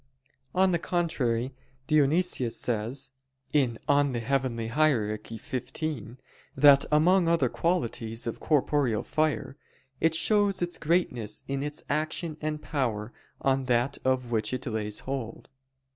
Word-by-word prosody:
On 190 0 +4
the 170 - +1
contrary, 135 -9 -1 0.3
Dionysius 150 -3 +2
says 125 +4 -2 0.4
(Coel. 130 -6 +2 0.4
Hier. 120 -1 +1
xv) 125 +4 -5 0.4
that 140 0 +7
among 170 +4 +4
other 170 0 +3
qualities 120 -9 -1
of 115 - -4
corporeal 140 -6 +1
fire, 155 -2 -1 0.4
"it 160 0 +3
shows 205 +1 +2
its 175 0 -3
greatness 150 - 0
in 135 0 -2
its 150 +1 -3
action 155 +2 -2
and 155 0 -2
power 120 -6 -2 0.3
on 135 0 +1
that 120 +1 +1
of 130 -2 0
which 110 0 0
it 125 - -6
lays 110 -3 -3
hold." 130 -4 -5
135 Hz, 115 wpm, -28 LUFS, 115-155 Hz, 0.4 s, that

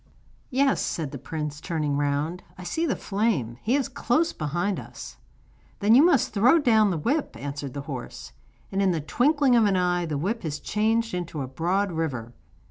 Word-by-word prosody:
'Yes,' 270 +1 +2
said 155 -5 -3
the 140 - -7
prince, 150 0 -5
turning 155 -5 -1
round, 145 +5 -1 0.2
'I 185 - -9
see 325 - -1
the 265 - 0
flame; 195 - -1
he 240 +5 +1
is 280 -2 +1
close 275 +5 0
behind 175 +6 -2
us.' - - -10 0.6
'Then 210 +2 +4
you 265 +5 +8
must 325 -8 +3
throw 235 +10 +5
down 220 -8 +4
the 175 - -1
whip,' 280 - -1
answered 140 -1 -6
the 140 - -3
horse.' 135 -4 -7 0.4
And 195 - 0
in 190 -2 +3
the 165 - -1
twinkling 270 - +3
of 230 -2 +5
an 200 -2 +2
eye 180 -1 +1
the 150 -2 -2
whip 205 +10 -2
was 150 -3 -3
changed 225 +1 0
into 170 -4 -3
a - - -5
broad 180 +8 0
river. 135 -8 -3
180 Hz, 190 wpm, -25 LUFS, 150-230 Hz, 0.6 s, you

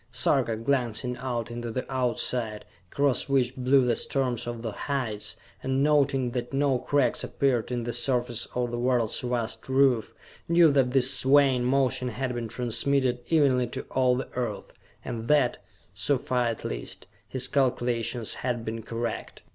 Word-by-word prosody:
Sarka, 125 -1 +1
glancing 125 0 -1
out 120 -2 -3
into 120 0 -5
the 125 +3 -3
Outside, 125 -4 -1 0.3
across 140 -1 +1
which 135 -3 +1
blew 130 +1 +3
the 120 -2 +2
storms 125 -3 0
of 120 -1 -5
the 115 - -3
heights, 115 -4 -3 0.3
and 135 +1 0
noting 140 -4 +2
that 120 +1 -4
no 135 -2 +2
cracks 140 +1 +1
appeared 125 -4 0
in 120 -1 -2
the 120 0 -3
surface 120 -1 0
of 120 -1 -1
the 120 - -3
world's 120 -2 +1
vast 120 -1 -3
roof, 130 -4 +2 0.3
knew 170 -2 +6
that 135 -3 +3
this 130 +1 +4
swaying 135 -2 +4
motion 130 -1 +1
had 125 +1 -3
been 120 -1 -4
transmitted 125 +2 0
evenly 135 -6 +3
to - - -6
all 130 -1 +3
the 130 - -4
Earth, 120 -5 -4 0.3
and 115 0 -5
that, 145 -4 +3 0.3
so 110 +8 +2
far 125 -1 0
at 115 -1 -4
least, - - -6 0.2
his 130 0 +1
calculations 120 -4 0
had 120 -3 -2
been 115 +1 -4
correct. 115 +1 -5
125 Hz, 160 wpm, -27 LUFS, 120-135 Hz, 0.3 s, knew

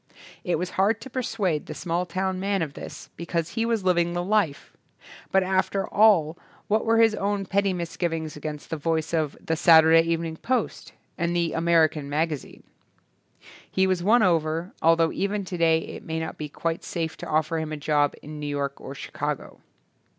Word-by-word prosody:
It 175 - 0
was 180 +2 -3
hard 205 +4 +3
to 265 - -9
persuade 210 - -1
the - - -6
small 175 +1 -2
town 190 +1 -2
man 195 -2 0
of 145 -3 -5
this - - -9
because 170 -1 -2
he 225 +3 -1
was 225 -4 0
living 175 -2 +2
the 175 0 -1
life; 195 -7 0 0.6
but 190 0 +4
after 190 +1 0
all 185 -7 +4 0.3
what 215 +1 +1
were 225 0 +4
his 225 -1 +5
own 200 -1 -1
petty 200 +1 +1
misgivings 165 -2 -3
against 150 0 -7
the 160 - -1
voice 160 +1 -1
of 155 -3 0
"The 160 - -2
Saturday 160 0 +7
Evening 165 -1 -2
Post" 255 +7 -2 0.3
and 170 0 0
"The 170 -2 0
American 160 -3 +2
Magazine"? 150 0 -3 1.1
He 190 - +2
was 185 -2 +1
won 220 +5 +4
over, 165 -1 +1
although 165 0 +4
even 200 0 -2
today 170 -3 +2
it - - -8
may 160 0 -3
not 160 - -4
be 150 -1 -6
quite 165 +3 -3
safe 165 -2 -3
to - - -7
offer 155 +1 +1
him 160 -1 -4
a 155 - -3
job 145 0 +1
in 150 0 -8
New 150 - -4
York 140 -1 -3
or 135 - -8
Chicago. - - -5
170 Hz, 180 wpm, -25 LUFS, 160-190 Hz, 1.1 s, Saturday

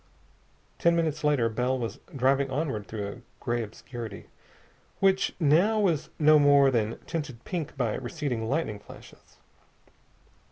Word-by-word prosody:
Ten 170 0 +4
minutes 160 -3 0
later 145 -6 +3
Bell 125 +3 0
was 115 -3 -4 0.2
driving 135 +1 +2
onward 135 -7 -2
through 105 -2 -4
a 100 +5 -8 0.2
gray 120 -1 -1
obscurity, 115 0 -8 0.7
which 195 0 +2
now 175 +8 +4
was 175 -8 +1
no 155 0 +6
more 140 -1 +6
than 115 -2 0
tinted 145 -8 -5
pink 165 -6 -4
by 120 -5 0
receding 125 -4 -3
lightning 135 -8 -1
flashes. - - -15
135 Hz, 130 wpm, -27 LUFS, 115-155 Hz, 0.7 s, no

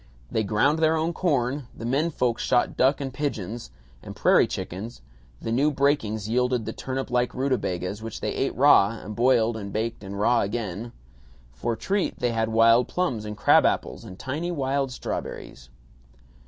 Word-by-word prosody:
They 110 - +1
ground 125 +10 +2
their 160 0 +3
own 160 +2 0
corn; 140 -6 0
the 115 - -6
men 140 +7 +1
folks 125 -6 -1
shot 125 -1 +1
ducks 135 +3 +2
and 135 -2 -4
pigeons 120 - -4 0.3
and - - -9
prairie - - +4
chickens; 100 - -6 0.4
the 115 - -4
new 135 +6 +3
breakings 135 -7 0
yielded 125 0 +1
the 110 - -4
turnip 130 -1 -4
like 125 0 0
rutabagas, 105 -7 -2
which 115 -1 -6
they - - -2
ate - - -1
raw - - +5
and 105 +3 -8
boiled 120 -1 +3
and 100 -2 -6
baked 110 0 -3
and 100 +1 -6
raw 120 +3 +3
again. 105 +1 -4 0.6
For 60 - -2
treat 195 - -1
they 120 -1 0
had 110 -1 0
wild 115 +2 +5
plums 130 -12 -2
and 105 -1 -6
crab - - +5
apples - - -1
and 95 - -10
tiny 150 - -3
wild 135 -3 -1
strawberries. 65 - -6
120 Hz, 170 wpm, -25 LUFS, 110-135 Hz, 0.6 s, raw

